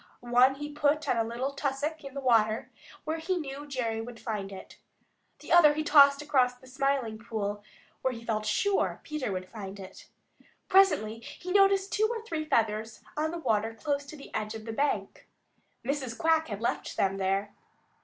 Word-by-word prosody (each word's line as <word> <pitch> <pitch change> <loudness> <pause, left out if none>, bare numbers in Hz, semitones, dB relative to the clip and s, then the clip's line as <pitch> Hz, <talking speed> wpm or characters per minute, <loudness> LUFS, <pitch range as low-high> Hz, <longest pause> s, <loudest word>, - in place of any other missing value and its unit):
One 255 +2 +6
he 295 +1 -6
put 295 +1 +1
on - - +2
a 225 - +3
little 240 +4 -3
tussock 285 +3 -3
in 275 -1 -9
the - - -2
water 225 -4 +2 0.3
where 315 +1 -2
he 360 +3 -1
knew 290 -2 -6
Jerry 230 -5 -2
would 230 0 -9
find 205 -3 -4
it. 190 - -11 0.6
The - - -9
other 305 -4 +7
he 310 - -1
tossed 280 -1 +6
across 255 -4 +2
the 250 - -19
Smiling 260 -4 -1
Pool 205 -2 -4 0.4
where 260 - +1
he 230 -1 -9
felt 215 -2 -1
sure 405 -1 +1
Peter 305 -8 -3
would 185 -1 -4
find 200 -2 -8
it. 190 -1 -11 0.6
Presently 360 - +4
he 355 +9 -8
noticed 390 0 +4
two 435 +1 +3
or 460 -2 -4
three 315 -8 -3
feathers 220 -4 0
on 310 +1 0
the 340 - -4
water 225 -6 0
close 285 +3 -2
to 310 - -9
the 280 - -13
edge 215 +1 -3
of 220 -1 -8
the 225 - -5
bank. 285 +5 -2 0.6
Mrs. 265 -3 -2
Quack 320 0 +2
had 205 -1 -5
left 235 - -2
them 195 0 +1
there. 195 +1 -1
260 Hz, 185 wpm, -29 LUFS, 220-300 Hz, 0.6 s, other